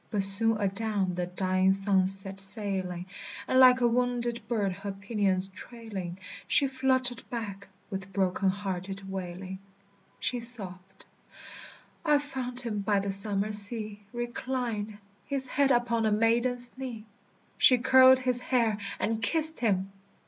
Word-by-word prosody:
But 205 Hz, -3 st, 0 dB
soon 220 Hz, +3 st, +4 dB
adown 200 Hz, -1 st, -2 dB
the 175 Hz, 0 st, -3 dB
dying 185 Hz, +1 st, +1 dB
sunset 195 Hz, 0 st, +3 dB
sailing, 190 Hz, -3 st, +1 dB, 0.4 s
And 260 Hz, -, +2 dB
like 255 Hz, -1 st, +6 dB
a 240 Hz, -, +4 dB
wounded 240 Hz, 0 st, -1 dB
bird 210 Hz, -5 st, -1 dB
her 200 Hz, +2 st, -6 dB
pinions 195 Hz, -2 st, +1 dB
trailing, 195 Hz, -4 st, -8 dB, 0.3 s
She 285 Hz, -, +2 dB
fluttered 260 Hz, -2 st, 0 dB
back, 200 Hz, -4 st, -6 dB, 0.2 s
with 195 Hz, 0 st, -6 dB
broken 190 Hz, 0 st, 0 dB
hearted 195 Hz, 0 st, -5 dB
wailing. 190 Hz, 0 st, -7 dB, 0.6 s
She 245 Hz, -, -2 dB
sobbed, 195 Hz, -6 st, -5 dB, 1.0 s
"I 300 Hz, -3 st, +3 dB
found 260 Hz, -4 st, -2 dB
him 225 Hz, -4 st, -4 dB
by 205 Hz, +1 st, 0 dB
the 195 Hz, 0 st, -3 dB
summer 200 Hz, +1 st, +4 dB
sea 210 Hz, 0 st, +2 dB
Reclined, 240 Hz, -3 st, -4 dB, 0.3 s
his 275 Hz, -2 st, -3 dB
head 275 Hz, +2 st, +1 dB
upon 235 Hz, -3 st, +1 dB
a -, -, 0 dB
maiden's 240 Hz, +3 st, 0 dB
knee, 240 Hz, -5 st, -7 dB, 0.5 s
She 255 Hz, -, +5 dB
curled 260 Hz, +1 st, +6 dB
his 255 Hz, -1 st, 0 dB
hair 235 Hz, -4 st, 0 dB, 0.2 s
and 225 Hz, +1 st, -2 dB
kissed 315 Hz, +8 st, +3 dB
him. 195 Hz, -4 st, -1 dB
215 Hz, 135 wpm, -28 LUFS, 195-245 Hz, 1.0 s, like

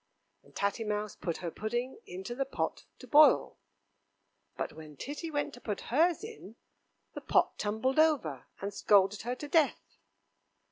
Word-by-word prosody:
And -, -, -23 dB
Tatty 200 Hz, +3 st, 0 dB
Mouse 210 Hz, -1 st, -2 dB
put 170 Hz, -2 st, -3 dB
her 170 Hz, -, -2 dB
pudding 240 Hz, +6 st, -3 dB
into 190 Hz, +6 st, -6 dB
the 270 Hz, +3 st, 0 dB
pot 270 Hz, -, -3 dB
to -, -, -12 dB
boil, 300 Hz, +1 st, +5 dB, 1.0 s
But -, -, -3 dB
when 155 Hz, -2 st, -11 dB
Titty 295 Hz, -, -5 dB
went 290 Hz, -1 st, -2 dB
to 245 Hz, -, -12 dB
put 210 Hz, -3 st, -3 dB
hers 335 Hz, +6 st, +3 dB
in, 435 Hz, -, -9 dB, 0.6 s
the -, -, -6 dB
pot -, -, +2 dB
tumbled 220 Hz, +7 st, 0 dB
over, 280 Hz, -, +2 dB
and 200 Hz, +1 st, -4 dB
scalded 200 Hz, 0 st, +3 dB
her 245 Hz, +2 st, -3 dB
to 295 Hz, -, -7 dB
death. 310 Hz, 0 st, +1 dB
235 Hz, 155 wpm, -31 LUFS, 200-290 Hz, 1.0 s, boil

